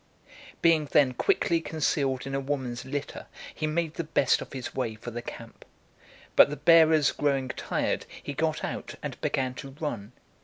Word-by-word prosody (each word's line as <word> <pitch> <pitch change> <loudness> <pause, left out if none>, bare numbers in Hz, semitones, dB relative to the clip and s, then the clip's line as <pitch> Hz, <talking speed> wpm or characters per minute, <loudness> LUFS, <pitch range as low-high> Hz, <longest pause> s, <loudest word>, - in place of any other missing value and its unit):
Being 165 -2 +5
then 140 -2 +3
quickly 165 +6 +1
concealed 140 -5 -1
in 135 - -5
a 135 - 0
woman's 135 -3 -3
litter, 145 +1 -5 0.3
he 155 - -2
made 160 0 -1
the 170 - -3
best 155 -3 +2
of - - -8
his 130 -2 -6
way 115 -4 -2
for 120 +2 -8
the 120 +1 -5
camp. - - -10 0.7
But - - +8
the 145 - -3
bearers 160 -3 +6
growing 135 -3 0
tired, - - -2 0.2
he 145 - -4
got 155 +2 -1
out, - - -5
and - - -6
began 130 -1 0
to 135 +1 -9
run. 120 -8 -4
140 Hz, 175 wpm, -27 LUFS, 130-155 Hz, 0.7 s, But